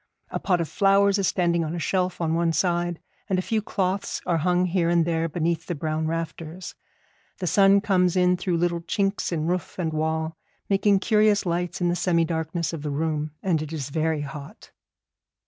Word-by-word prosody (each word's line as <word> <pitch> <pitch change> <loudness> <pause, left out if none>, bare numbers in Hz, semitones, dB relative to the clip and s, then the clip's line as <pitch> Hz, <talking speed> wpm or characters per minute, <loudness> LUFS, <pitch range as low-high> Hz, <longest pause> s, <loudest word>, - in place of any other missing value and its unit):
A - - -2
pot 180 -3 +1
of 165 - -1
flowers 200 +1 +3
is 195 - +1
standing 170 -2 +1
on 160 +2 -3
a - - -3
shelf 185 +1 -1
on 160 -1 0
one 165 0 +1
side, 175 0 0 0.3
and 190 - +1
a - - +1
few 220 +1 0
cloths 195 -1 -2
are 170 -2 +1
hung 180 +2 +2
here 175 -1 +1
and 170 -1 +3
there 165 -1 0
beneath 170 +1 -1
the 175 - -2
brown 155 +1 -2
rafters. 165 +2 -5 0.6
The 185 - -4
sun 195 +3 +5
comes 180 -4 +2
in 180 0 +4
through 180 -1 -1
little 170 0 0
chinks 195 +2 -1
in 160 -2 -1
roof 180 +1 -2
and 165 -4 -2
wall, 160 +1 -1 0.3
making 195 0 +3
curious 210 -2 +3
lights 175 +1 -2
in 175 - +2
the 175 - +1
semi 170 -1 +2
darkness 165 0 -2
of 160 - -5
the 150 - -3
room, 150 0 -2
and 170 -5 +1
it 155 0 -6
is 145 -4 -5
very 160 0 0
hot. 140 0 -9
170 Hz, 200 wpm, -25 LUFS, 160-185 Hz, 0.6 s, sun